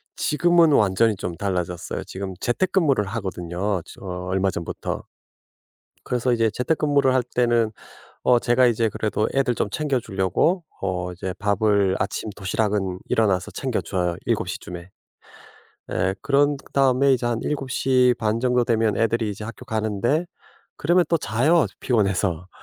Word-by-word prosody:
지금은 170 Hz, 0 st, +3 dB
완전히 105 Hz, -2 st, +3 dB
좀 90 Hz, -2 st, -5 dB
달라졌어요. 90 Hz, -3 st, -3 dB
지금 95 Hz, 0 st, -6 dB
재택근무를 150 Hz, -, +1 dB
하거든요. 95 Hz, -2 st, -3 dB
저 -, -, -14 dB, 0.3 s
얼마 95 Hz, +1 st, +1 dB
전부터. 85 Hz, -2 st, -4 dB, 1.0 s
그래서 125 Hz, 0 st, 0 dB
이제 115 Hz, -2 st, +2 dB
재택근무를 140 Hz, +2 st, +1 dB
할 130 Hz, -, +3 dB
때는 120 Hz, -2 st, +2 dB, 0.5 s
어 125 Hz, -1 st, +5 dB
제가 120 Hz, +2 st, +3 dB
이제 115 Hz, -2 st, +2 dB
그래도 105 Hz, +1 st, -1 dB
애들 135 Hz, -3 st, +1 dB
좀 105 Hz, -, -1 dB
챙겨주려고 130 Hz, -, 0 dB, 0.2 s
어 90 Hz, -2 st, -2 dB
이제 90 Hz, +1 st, -5 dB
밥을 100 Hz, -2 st, +2 dB
아침 100 Hz, +2 st, -2 dB
도시락은 95 Hz, -2 st, -1 dB
일어나서 100 Hz, -5 st, +1 dB
챙겨줘요. 90 Hz, -2 st, -2 dB
7:00 -, -, -1 dB
쯤에. 85 Hz, 0 st, -9 dB, 1.0 s
예 95 Hz, +2 st, 0 dB
그런 145 Hz, +1 st, +3 dB, 0.2 s
다음에 135 Hz, 0 st, +3 dB
이제 120 Hz, -1 st, -1 dB
한 120 Hz, -1 st, 0 dB
7:30 125 Hz, -5 st, +1 dB
정도 125 Hz, 0 st, +2 dB
되면 115 Hz, -2 st, +1 dB
애들이 115 Hz, -1 st, +1 dB
이제 105 Hz, +1 st, -6 dB
학교 115 Hz, +3 st, -8 dB
가는데 110 Hz, -, 0 dB, 0.5 s
그러면 175 Hz, +4 st, +3 dB
또 165 Hz, -, +3 dB
자요. 145 Hz, +5 st, +2 dB, 0.2 s
피곤해서. 95 Hz, -7 st, 0 dB
110 Hz, 295 characters per minute, -23 LUFS, 95-130 Hz, 1.0 s, 어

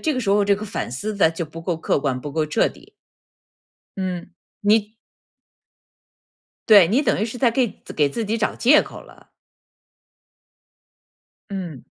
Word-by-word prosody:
这 310 Hz, -, 0 dB
个 255 Hz, -, -2 dB
时 225 Hz, -, -4 dB
候 205 Hz, 0 st, +3 dB
这 200 Hz, 0 st, +3 dB
个 210 Hz, -, -6 dB
反 190 Hz, -, -4 dB
思 210 Hz, -, -4 dB
得 195 Hz, -5 st, +3 dB
就 165 Hz, +1 st, -4 dB
不 160 Hz, +2 st, -10 dB
够 175 Hz, -1 st, -2 dB
客 160 Hz, -, 0 dB
观， 135 Hz, -3 st, -2 dB
不 145 Hz, +2 st, -7 dB
够 155 Hz, +1 st, 0 dB
彻 155 Hz, +9 st, +1 dB
底。 365 Hz, +7 st, -17 dB, 1.1 s
嗯， 185 Hz, -2 st, -4 dB, 0.3 s
你 210 Hz, +1 st, +2 dB, 1.8 s
对， 200 Hz, -6 st, +8 dB
你 240 Hz, +9 st, +2 dB
等 295 Hz, -, +1 dB
于 215 Hz, -, 0 dB
是 235 Hz, +2 st, -7 dB
在 245 Hz, -1 st, +4 dB
给 240 Hz, -1 st, -1 dB, 0.2 s
给 150 Hz, -, +4 dB
自 220 Hz, +11 st, -4 dB
己 220 Hz, +2 st, -1 dB
找 215 Hz, -, 0 dB
借 280 Hz, +5 st, +5 dB
口 -, -, -11 dB
了。 -, -, -19 dB, 2.2 s
嗯。 175 Hz, -9 st, -6 dB
200 Hz, 175 characters per minute, -22 LUFS, 165-225 Hz, 2.2 s, 对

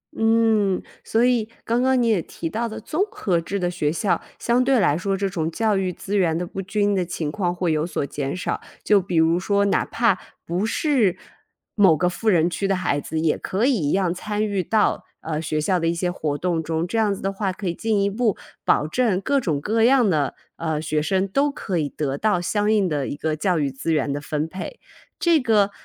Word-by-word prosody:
嗯， 225 Hz, -4 st, +2 dB, 0.2 s
所 230 Hz, +2 st, +2 dB
以 235 Hz, -3 st, +1 dB, 0.2 s
刚 235 Hz, +2 st, +1 dB
刚 260 Hz, -1 st, +3 dB
你 235 Hz, -, +2 dB
也 215 Hz, -6 st, +2 dB
提 165 Hz, -, -6 dB
到 230 Hz, +6 st, -2 dB
的 215 Hz, -, -6 dB
综 330 Hz, +6 st, -1 dB
合 180 Hz, -, 0 dB
制 200 Hz, +4 st, -3 dB
的 175 Hz, -1 st, 0 dB
学 155 Hz, -4 st, 0 dB
校， 180 Hz, +4 st, 0 dB, 0.2 s
相 240 Hz, +2 st, +2 dB
对 265 Hz, -1 st, +3 dB
来 145 Hz, -8 st, +3 dB
说 195 Hz, +2 st, -1 dB
这 195 Hz, +1 st, 0 dB
种 165 Hz, -4 st, -2 dB
教 215 Hz, +4 st, +1 dB
育 190 Hz, -1 st, 0 dB
资 195 Hz, +3 st, -5 dB
源 170 Hz, -5 st, +2 dB
的 180 Hz, -, -2 dB
不 195 Hz, +2 st, -6 dB
均 205 Hz, +2 st, 0 dB
的 185 Hz, -, +1 dB
情 160 Hz, -3 st, -3 dB
况 180 Hz, -2 st, -1 dB
会 175 Hz, -1 st, -1 dB
有 155 Hz, 0 st, +1 dB
所 155 Hz, -4 st, -2 dB
减 140 Hz, +1 st, -4 dB
少， -, -, -3 dB, 0.2 s
就 205 Hz, -2 st, +4 dB
比 180 Hz, -1 st, -4 dB
如 165 Hz, +2 st, +4 dB
说， 200 Hz, +2 st, +1 dB
哪 200 Hz, -, +2 dB
怕 230 Hz, -5 st, +1 dB, 0.3 s
不 180 Hz, +5 st, -1 dB
是 235 Hz, -, +1 dB, 0.6 s
某 190 Hz, -7 st, +5 dB
个 180 Hz, -, +2 dB
富 220 Hz, +5 st, -1 dB
人 170 Hz, -4 st, +4 dB
区 195 Hz, +3 st, -2 dB
的 195 Hz, -, +2 dB
孩 175 Hz, -6 st, 0 dB
子， 160 Hz, +3 st, -3 dB
也 160 Hz, -1 st, +1 dB
可 200 Hz, +5 st, -1 dB
以 275 Hz, -, +4 dB, 0.2 s
一 -, -, +1 dB
样 185 Hz, -3 st, +1 dB
参 210 Hz, +3 st, -2 dB
与 200 Hz, -3 st, -1 dB
到， 215 Hz, +4 st, +1 dB, 0.2 s
呃， 155 Hz, -1 st, -3 dB
学 155 Hz, -1 st, -2 dB
校 180 Hz, +4 st, +1 dB
的 165 Hz, -, 0 dB
一 170 Hz, -, +1 dB
些 175 Hz, +1 st, -1 dB
活 150 Hz, -5 st, -2 dB
动 170 Hz, -1 st, 0 dB
中， 160 Hz, +1 st, -2 dB
这 205 Hz, +6 st, -3 dB
样 210 Hz, -2 st, +2 dB
子 -, -, -10 dB
的 195 Hz, 0 st, -1 dB
话， 195 Hz, -1 st, -1 dB
可 185 Hz, +1 st, -6 dB
以 170 Hz, -, 0 dB
进 220 Hz, +2 st, 0 dB
一 -, -, +2 dB
步 220 Hz, -1 st, 0 dB, 0.3 s
保 -, -, +3 dB
证 215 Hz, 0 st, +1 dB
各 280 Hz, +8 st, +1 dB
种 160 Hz, -, -1 dB
各 220 Hz, +9 st, 0 dB
样 250 Hz, -1 st, +5 dB
的， 150 Hz, -7 st, 0 dB, 0.2 s
呃， 160 Hz, -2 st, -2 dB
学 155 Hz, -1 st, -1 dB
生 190 Hz, +4 st, 0 dB
都 275 Hz, +9 st, +1 dB
可 195 Hz, -10 st, -3 dB
以 150 Hz, -2 st, -1 dB
得 140 Hz, -2 st, -3 dB
到 210 Hz, -4 st, +2 dB
相 205 Hz, +4 st, 0 dB
应 205 Hz, -4 st, +3 dB
的 145 Hz, -4 st, -1 dB
一 -, -, -4 dB
个 155 Hz, +1 st, -2 dB
教 180 Hz, +3 st, 0 dB
育 145 Hz, -3 st, 0 dB
资 135 Hz, +5 st, -3 dB
源 150 Hz, -2 st, +1 dB
的 145 Hz, -, -4 dB
分 150 Hz, +1 st, -2 dB
配。 185 Hz, -, -7 dB, 0.4 s
这 335 Hz, -2 st, +4 dB
个 215 Hz, -6 st, +3 dB
190 Hz, 255 characters per minute, -23 LUFS, 165-215 Hz, 0.6 s, 某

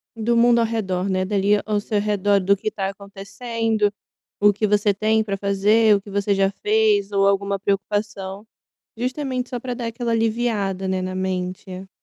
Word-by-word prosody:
do 230 Hz, +1 st, 0 dB
mundo 235 Hz, 0 st, +5 dB
ao 230 Hz, -, +3 dB
redor, 195 Hz, -4 st, -2 dB
né, 185 Hz, 0 st, 0 dB
dali 200 Hz, +1 st, +2 dB
ao 210 Hz, -1 st, 0 dB
seu 205 Hz, 0 st, -1 dB
redor 205 Hz, -1 st, +2 dB
do 195 Hz, +1 st, +3 dB
que 215 Hz, -, -3 dB
tá 195 Hz, -2 st, -2 dB
acontecendo, 205 Hz, +2 st, -2 dB, 0.5 s
o 205 Hz, 0 st, +6 dB
que 210 Hz, +2 st, -1 dB
você 205 Hz, 0 st, +2 dB
tem 220 Hz, +2 st, +1 dB
para 200 Hz, -2 st, -3 dB
fazer, 205 Hz, +2 st, +3 dB
o 200 Hz, -, -2 dB
que 200 Hz, -, -13 dB
você 200 Hz, 0 st, 0 dB
já 195 Hz, 0 st, +2 dB
fez 210 Hz, -1 st, +2 dB
ou 195 Hz, 0 st, +3 dB
alguma 200 Hz, 0 st, 0 dB
preocupação, 200 Hz, 0 st, -2 dB, 0.5 s
justamente 255 Hz, +1 st, -3 dB
só 245 Hz, -, -4 dB
para 250 Hz, 0 st, -4 dB
dar 235 Hz, -1 st, -4 dB
aquela 235 Hz, +1 st, -3 dB
aliviada, 220 Hz, -4 st, 0 dB
né, 190 Hz, 0 st, -1 dB
na 185 Hz, 0 st, -4 dB
mente. 185 Hz, 0 st, -4 dB
205 Hz, 180 wpm, -22 LUFS, 195-220 Hz, 0.5 s, o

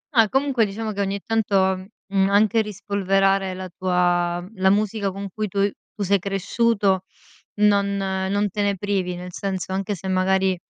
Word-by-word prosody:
Ah, 225 Hz, -3 st, +5 dB
comunque, 265 Hz, -4 st, +2 dB
diciamo, 215 Hz, +2 st, -4 dB
che 200 Hz, -1 st, -3 dB
ogni 200 Hz, 0 st, -1 dB
tanto, 225 Hz, -3 st, 0 dB, 0.5 s
mhmm, 195 Hz, -1 st, +1 dB
anche 215 Hz, +2 st, +4 dB
rispolverare 195 Hz, -2 st, 0 dB
la 185 Hz, 0 st, -6 dB
tua 175 Hz, -2 st, +1 dB
mhmm, 180 Hz, +3 st, -12 dB
la 190 Hz, -, +5 dB
musica 205 Hz, 0 st, +1 dB
con 200 Hz, +1 st, -6 dB
cui 215 Hz, -1 st, -2 dB
tu 200 Hz, +1 st, +1 dB, 0.3 s
tu 215 Hz, -, -7 dB
sei 200 Hz, +1 st, +2 dB
cresciuto, 195 Hz, 0 st, +1 dB, 0.5 s
non 205 Hz, -1 st, +3 dB
non 195 Hz, +1 st, 0 dB
te 205 Hz, -, -2 dB
ne 200 Hz, 0 st, +1 dB
privi, 190 Hz, -2 st, -1 dB
nel 180 Hz, +1 st, -8 dB
senso 190 Hz, -1 st, -3 dB
anche 195 Hz, +2 st, -2 dB
se, 190 Hz, +1 st, -8 dB
magari, 190 Hz, 0 st, +2 dB
195 Hz, 170 wpm, -23 LUFS, 190-205 Hz, 0.5 s, Ah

